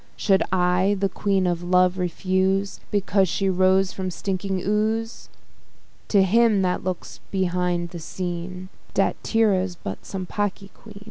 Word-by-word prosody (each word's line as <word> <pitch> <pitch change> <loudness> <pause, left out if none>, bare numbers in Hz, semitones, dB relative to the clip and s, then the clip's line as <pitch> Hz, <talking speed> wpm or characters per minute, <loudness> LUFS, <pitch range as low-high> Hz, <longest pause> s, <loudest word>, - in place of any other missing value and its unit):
Should 195 -2 +3
I 185 +2 +2
the 195 0 +1
Queen 195 -1 0
of 175 -1 0
Love 180 +1 +3
refuse, 190 +2 0
Because 195 -2 +1
she 195 +3 0
rose 185 +1 +3
from 190 -1 -3
stinking 190 +1 -3
ooze? 220 +2 -1 0.8
To 200 -2 +4
him 215 0 +3
that 180 -1 0
looks 185 -1 -5
behind 180 -2 0
the 170 - -8
scene, 180 +2 -5 0.3
Statira's 195 -5 +1
but 100 - -7
some 190 -2 -5
pocky 200 0 -3
quean. 215 -3 -13
190 Hz, 135 wpm, -24 LUFS, 180-200 Hz, 0.8 s, To